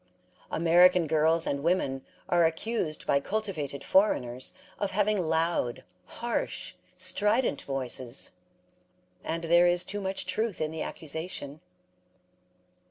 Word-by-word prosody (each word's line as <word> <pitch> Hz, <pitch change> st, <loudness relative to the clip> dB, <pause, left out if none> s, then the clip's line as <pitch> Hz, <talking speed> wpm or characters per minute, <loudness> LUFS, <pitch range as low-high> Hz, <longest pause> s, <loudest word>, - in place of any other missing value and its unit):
American 175 Hz, +1 st, +5 dB
girls 160 Hz, +1 st, +2 dB
and 140 Hz, 0 st, -1 dB
women 140 Hz, -5 st, 0 dB, 0.2 s
are 175 Hz, -1 st, +3 dB
accused 165 Hz, 0 st, -1 dB
by 140 Hz, -, +3 dB
cultivated 155 Hz, -7 st, -3 dB
foreigners 130 Hz, -, +2 dB, 0.3 s
of 200 Hz, -, 0 dB
having 200 Hz, -2 st, +1 dB
loud, 160 Hz, -6 st, 0 dB, 0.2 s
harsh, 240 Hz, -, -3 dB, 0.2 s
strident 210 Hz, -, +1 dB
voices; 130 Hz, -3 st, -4 dB, 0.9 s
and 165 Hz, +1 st, -3 dB
there 170 Hz, +1 st, +5 dB
is 175 Hz, 0 st, +2 dB
too 205 Hz, +1 st, -3 dB
much 190 Hz, -1 st, -2 dB
truth 210 Hz, +3 st, -2 dB
in 155 Hz, 0 st, -1 dB
the 160 Hz, -1 st, -5 dB
accusation. 160 Hz, -2 st, -5 dB
165 Hz, 110 wpm, -28 LUFS, 150-190 Hz, 0.9 s, American